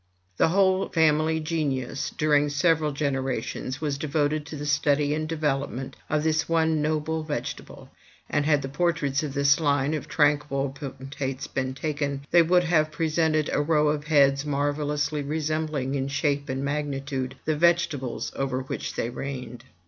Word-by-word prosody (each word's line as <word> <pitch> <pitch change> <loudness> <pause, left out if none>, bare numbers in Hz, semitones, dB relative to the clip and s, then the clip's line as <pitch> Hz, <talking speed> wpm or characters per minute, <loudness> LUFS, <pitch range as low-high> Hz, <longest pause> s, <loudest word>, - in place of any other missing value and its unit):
The - - +4
whole 190 +2 +2
family 160 0 +3
genius, 145 -5 -2
during 150 -1 +2
several 150 +1 +2
generations, 135 -3 -2
was 145 -3 -2
devoted 150 0 0
to 160 - -7
the 145 0 -5
study 145 0 +2
and 155 0 -2
development 140 -4 -2
of 155 -1 +1
this 160 0 +1
one 160 -2 +2
noble 155 +1 -1
vegetable; 155 -2 -6 0.4
and 145 - +1
had 150 -3 +3
the - - -3
portraits 145 -2 0
of 150 -3 -5
this 140 +2 +4
line 145 -1 +1
of 155 - -3
tranquil 145 -2 +1
potentates 135 -1 -5
been 130 0 -3
taken, 140 -1 -3
they 175 - +7
would 180 +2 +4
have 155 -3 +2
presented 155 0 +1
a - - +2
row 150 0 +3
of 150 0 -1
heads 140 -3 +4
marvellously 145 +1 -1
resembling 155 -2 -2
in 135 -1 -1
shape 140 0 -1
and 135 +1 -2
magnitude 140 -2 -3
the 155 - +1
vegetables 165 -6 +1
over 135 -1 -1
which 130 - -5
they 115 - -2
reigned. 125 -2 -6
145 Hz, 155 wpm, -26 LUFS, 140-155 Hz, 0.4 s, they